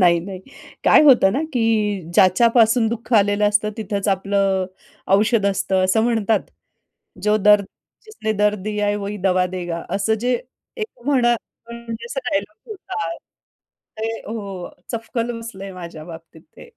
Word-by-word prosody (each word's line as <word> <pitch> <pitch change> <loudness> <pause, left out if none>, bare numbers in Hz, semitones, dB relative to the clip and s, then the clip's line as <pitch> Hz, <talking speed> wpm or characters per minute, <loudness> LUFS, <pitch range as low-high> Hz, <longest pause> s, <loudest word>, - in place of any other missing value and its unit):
नाही, 175 -2 +5
नाही. 185 +1 -8 0.4
काय - - +7
होतं 245 -9 +6
ना, 285 +6 0
की 215 -5 +1
ज्याच्यापासून 225 +5 +4
दुःख 230 +1 -5
आलेलं 205 0 +4
असतं, 210 +1 +1
तिथेच 205 -2 -3
आपलं, 195 -1 +1 0.5
औषध 210 0 +3
असतं, 190 -1 +1
असं 205 +4 +2
म्हणतात. 225 -2 +1 0.8
जो 210 0 +3
दर्द 210 0 +5 0.4
जिसने 325 - -3
दर्द 210 0 +1
दिया 210 -1 -1
है, 205 - +1
वही 205 0 -4
दवा 185 -1 +2
देगा. 175 -2 -4
असं 200 +2 +1
जे, 250 +1 +1 0.4
एक 435 - -7
म्हणा 245 -4 +3 0.4
म्हणजे, 235 -1 -7
असा 270 +2 -4
एक - - -5
डायलॉग 205 - -4
होता. 405 +1 -5 0.9
ते 220 - -2 0.2
हो, 200 -5 -6 0.2
चपकन 230 +1 -3
बसलंय 195 -4 -8
माझ्या 170 -4 -9
बाबतीत 165 -1 -12
ते. 480 - -13
210 Hz, 145 wpm, -21 LUFS, 195-230 Hz, 0.9 s, काय